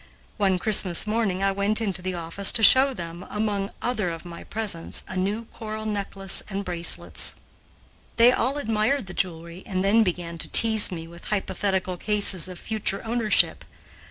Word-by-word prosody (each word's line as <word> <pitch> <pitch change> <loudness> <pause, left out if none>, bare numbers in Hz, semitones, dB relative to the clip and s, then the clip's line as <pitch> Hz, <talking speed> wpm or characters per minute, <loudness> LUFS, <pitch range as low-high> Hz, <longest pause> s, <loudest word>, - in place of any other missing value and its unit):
One 195 -3 +1
Christmas 185 -2 +5
morning 210 -4 -1
I 195 - +2
went 200 +3 +1
into 195 -5 -2
the 185 0 -4
office 170 +4 +1
to 225 - +3
show 265 +4 +7
them, 170 -6 -8
among 205 -2 -2
other 220 -7 -1
of 165 0 -8
my 170 -1 -10
presents, 205 -7 -3
a - - -8
new 200 +5 -2
coral 215 -1 -7
necklace 200 -2 0
and 200 0 -4
bracelets. 175 -1 -2 0.8
They 235 +1 +6
all 260 +3 -1
admired 225 0 -1
the 190 - -9
jewelry 170 -1 -4
and 185 -1 -2
then 215 +3 +4
began 175 -4 -3
to - - -8
tease 220 -3 +4
me 165 -2 -7
with 170 +1 -12
hypothetical 190 -2 -2
cases 200 -3 +1
of 180 -1 -9
future 215 +1 -1
ownership. 225 -2 +2
195 Hz, 165 wpm, -24 LUFS, 180-220 Hz, 0.8 s, show